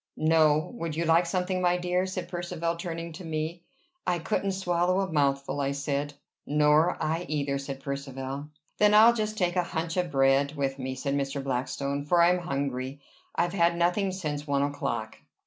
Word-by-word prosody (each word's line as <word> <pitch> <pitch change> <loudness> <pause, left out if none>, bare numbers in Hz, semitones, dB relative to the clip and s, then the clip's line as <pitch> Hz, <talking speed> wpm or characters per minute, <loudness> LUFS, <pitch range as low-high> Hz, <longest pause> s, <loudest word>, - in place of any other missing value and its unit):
"No. 155 -1 +3
Would 165 -2 -3
you 170 +1 -1
like 165 +2 +4
something, 185 +1 -1
my 180 0 +3
dear?" 180 +1 0
said 185 -1 -4
Percivale 175 -1 -3
turning 170 -1 -5
to 170 - -9
me. 160 +1 -3 0.5
"I 180 -1 +2
couldn't 195 +3 -1
swallow 180 0 +1
a 190 -3 -3
mouthful," 140 -1 +1
I 140 0 0
said. 140 +1 -2 0.3
"Nor 150 +3 +3
I 165 +3 -1
either," 140 -2 -1
said 135 -1 -6
Percivale. 140 0 -5 0.3
"Then 210 0 +5
I'll 225 +2 +8
just 215 -1 -2
take 180 -2 +1
a 180 - +3
hunch 165 0 -3
of 180 -1 +1
bread 135 +1 +3
with 135 -1 -2
me," 130 0 -3
said 140 +2 -2
Mr. 140 0 -2
Blackstone, 140 +2 -2
"for 175 +4 +3
I 170 +1 +6
am 180 - +1
hungry. 140 -4 -3 0.4
I've 175 +1 +1
had 170 -2 +3
nothing 180 +3 +2
since 150 -5 -4
one 140 -1 +2
o'clock." 115 -6 -3
155 Hz, 180 wpm, -28 LUFS, 140-175 Hz, 0.5 s, I'll